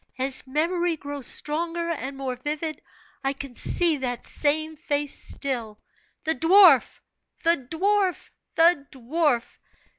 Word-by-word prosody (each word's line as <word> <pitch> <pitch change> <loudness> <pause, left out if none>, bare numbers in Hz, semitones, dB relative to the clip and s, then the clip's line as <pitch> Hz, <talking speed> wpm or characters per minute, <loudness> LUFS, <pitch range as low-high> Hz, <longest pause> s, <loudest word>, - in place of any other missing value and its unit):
As 265 +1 -1
memory 335 +4 0
grows 285 -2 -4
stronger 335 +3 +2
and 275 -3 -5
more 265 -2 -3
vivid, 300 +4 -4 0.4
I 270 +1 0
can 275 -2 -8
see 330 +5 +1
that 245 -3 -4
same 310 +1 -1
face 290 -2 -2
still 235 -6 -4 0.4
the 320 - +1
dwarf! 330 -1 +5 0.4
the 330 -7 +1
dwarf! 390 +2 0 0.2
the 325 -4 +4
dwarf! 265 -1 -1
295 Hz, 120 wpm, -25 LUFS, 270-335 Hz, 0.4 s, dwarf